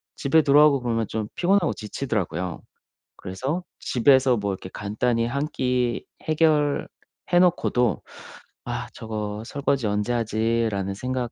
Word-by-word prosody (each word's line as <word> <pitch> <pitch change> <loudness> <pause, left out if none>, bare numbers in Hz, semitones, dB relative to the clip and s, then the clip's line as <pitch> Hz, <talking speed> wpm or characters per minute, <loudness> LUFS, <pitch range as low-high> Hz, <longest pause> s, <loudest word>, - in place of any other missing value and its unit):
집에 150 +3 +3
들어오고 145 -1 +5
그러면 115 -3 -1
좀 110 -1 -3
피곤하고 185 -1 +2
지치더라고요. 95 - -3 0.6
그래서 135 - -4 0.2
집에서 130 0 +3
뭐 100 -1 -2
이렇게 95 - -8
간단히 115 +3 -1
한 140 +5 -1
끼 125 -2 0 0.2
해결해 155 -2 +2 0.5
놓고도 125 - +2 0.6
'아 - - -4
저거 105 -1 -5
설거지 135 -3 -1
언제 105 +4 0
하지?'라는 110 -3 0
생각 125 +2 -3
120 Hz, 290 characters per minute, -24 LUFS, 105-140 Hz, 0.6 s, 들어오고